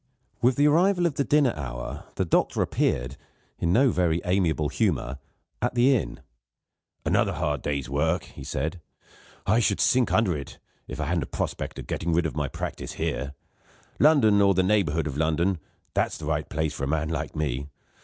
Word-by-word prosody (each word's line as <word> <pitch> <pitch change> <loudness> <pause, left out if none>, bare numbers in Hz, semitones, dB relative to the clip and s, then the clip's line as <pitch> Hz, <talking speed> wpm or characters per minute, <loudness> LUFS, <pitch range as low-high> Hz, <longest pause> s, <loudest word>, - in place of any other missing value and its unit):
With 125 +1 +4
the 145 +2 +4
arrival 175 +4 +3
of 170 - +1
the 140 - 0
dinner 145 -3 +3
hour 60 -4 -6
the 95 - 0
doctor 80 - +2
appeared, 60 +3 -1 0.4
in 85 - +1
no 125 +6 +4
very 85 -3 +1
amiable 85 -5 +1
humour, 70 +1 -1 0.4
at 120 +1 0
the 130 +3 +5
inn. 115 - -3 0.8
"Another - - +2
hard 75 -3 -1
day's 70 -2 -2
work," 80 +6 0
he - - -11
said; 80 +6 -3 0.6
"I 110 +4 +3
should 105 -3 +1
sink 125 -1 +3
under 105 -7 +2
it, 70 -2 -7 0.3
if 65 - -7
I 80 - -1
hadn't 85 +2 0
a - - -15
prospect - - -4
of - - -6
getting 85 +1 -2
rid 85 +1 +2
of 80 - -3
my 75 -2 -1
practice - - -5
here. 70 +2 -3 0.6
London 120 -10 +5
or 100 -1 +4
the 95 - +3
neighbourhood 90 -5 +2
of 70 -2 -4
London 80 +4 +1 0.3
there's - - 0
the 75 - -7
right 75 0 -1
place 80 0 -1
for 70 - -6
a - - -3
man 80 +1 0
like 80 -1 -3
Me. 70 -3 -2
85 Hz, 185 wpm, -26 LUFS, 75-110 Hz, 0.8 s, the